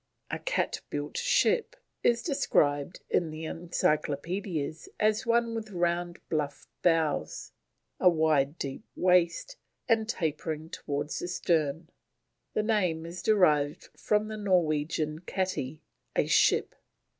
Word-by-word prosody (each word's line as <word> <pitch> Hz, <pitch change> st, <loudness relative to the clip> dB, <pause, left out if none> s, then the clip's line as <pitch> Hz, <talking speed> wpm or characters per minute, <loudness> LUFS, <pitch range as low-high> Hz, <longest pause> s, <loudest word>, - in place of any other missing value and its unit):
A -, -, -2 dB
cat -, -, -1 dB
built -, -, -4 dB
ship 485 Hz, 0 st, +2 dB, 0.3 s
is 235 Hz, -1 st, +2 dB
described 150 Hz, -, +1 dB
in 170 Hz, -, +1 dB
the 155 Hz, +1 st, -6 dB
Encyclopaedias 160 Hz, 0 st, -2 dB
as 215 Hz, +2 st, +2 dB
one 235 Hz, 0 st, +2 dB
with 220 Hz, -1 st, -4 dB
round 175 Hz, -1 st, -1 dB
bluff 145 Hz, -3 st, -2 dB
bows, 165 Hz, -4 st, +1 dB, 0.5 s
a 180 Hz, -, +7 dB
wide 155 Hz, -3 st, +2 dB
deep 135 Hz, +7 st, -5 dB
waist, 180 Hz, -, +2 dB, 0.3 s
and 225 Hz, -2 st, +2 dB
tapering 160 Hz, -3 st, -2 dB
towards 145 Hz, +1 st, -3 dB
the -, -, -4 dB
stern. 165 Hz, -2 st, 0 dB, 0.6 s
The 215 Hz, -, +2 dB
name 185 Hz, -7 st, +1 dB
is 170 Hz, +2 st, -7 dB
derived 155 Hz, -9 st, +3 dB
from 210 Hz, 0 st, +1 dB
the 215 Hz, 0 st, -5 dB
Norwegian 155 Hz, -5 st, +1 dB
kati, 180 Hz, -7 st, -3 dB, 0.3 s
a -, -, +3 dB
ship. -, -, +3 dB
170 Hz, 120 wpm, -29 LUFS, 155-210 Hz, 0.6 s, a